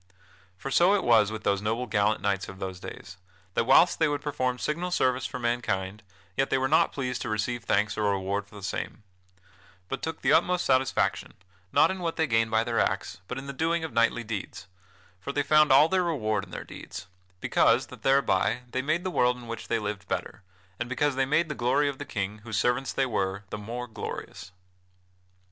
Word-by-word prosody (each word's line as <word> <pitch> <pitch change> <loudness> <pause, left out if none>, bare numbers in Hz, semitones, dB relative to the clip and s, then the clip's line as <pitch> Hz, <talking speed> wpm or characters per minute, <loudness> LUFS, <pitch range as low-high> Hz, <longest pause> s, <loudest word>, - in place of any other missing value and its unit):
For 135 - -6
so 180 +8 +5
it 200 - 0
was 110 -3 +4
with 110 -1 -6
those 100 -1 +1
noble 115 +4 -1
gallant 105 -2 +1
knights 100 -1 -1
of 95 - -9
those 95 -2 -5
days; 95 0 -9 0.4
that 115 - +1
whilst 135 +7 +5
they 160 - +4
would 145 -1 -2
perform 130 -4 -1
signal 170 +7 -2
service 130 -7 +1
for 130 - -6
mankind, 105 -5 -2 0.3
yet 135 - +1
they - - +2
were 130 0 +1
not - - +3
pleased 125 -3 -3
to - - -3
receive 115 +3 -2
thanks 105 +1 +1
or 105 -1 +2
reward 100 +1 -1
for 105 - -17
the 100 - -10
same, 105 - -4 0.9
but 135 - -3
took 160 0 -5
the 140 - +4
utmost 175 +2 +3
satisfaction, 130 0 +1 0.4
not - - +5
in 190 - -5
what 170 -2 -2
they 160 - +2
gained 115 -4 +2
by 110 0 +2
their 115 -1 -1
acts, - - -1
but 125 - -5
in 135 - -6
the 140 - -6
doing 165 +4 0
of 160 - -5
knightly 115 +1 +2
deeds, 105 -3 -6 0.5
for 95 - -5
they 145 +1 0
found 150 0 +5
all 140 +4 +7
their 190 +1 +2
reward 110 - 0
in - - -19
their - - -6
deeds, - - -9 0.3
because - - +3
that - - -13
thereby 125 -4 +2
they 130 - -1
made 155 +6 0
the 185 - -2
world 125 -5 +2
in 120 - -11
which 115 0 -6
they - - +1
lived 105 -2 -4
better; - - -4 0.4
and 120 0 -3
because 145 +3 +1
they 135 0 +1
made 155 +4 +2
the 150 - -3
glory 135 +3 +2
of 140 -2 -3
the - - -5
King, 100 +1 -4
whose 110 0 -5
servants 125 +4 +1
they 135 - +1
were, 95 -5 -2
the - - -3
more 120 +4 -5
glorious. 110 -5 -7
125 Hz, 215 wpm, -27 LUFS, 105-140 Hz, 0.9 s, all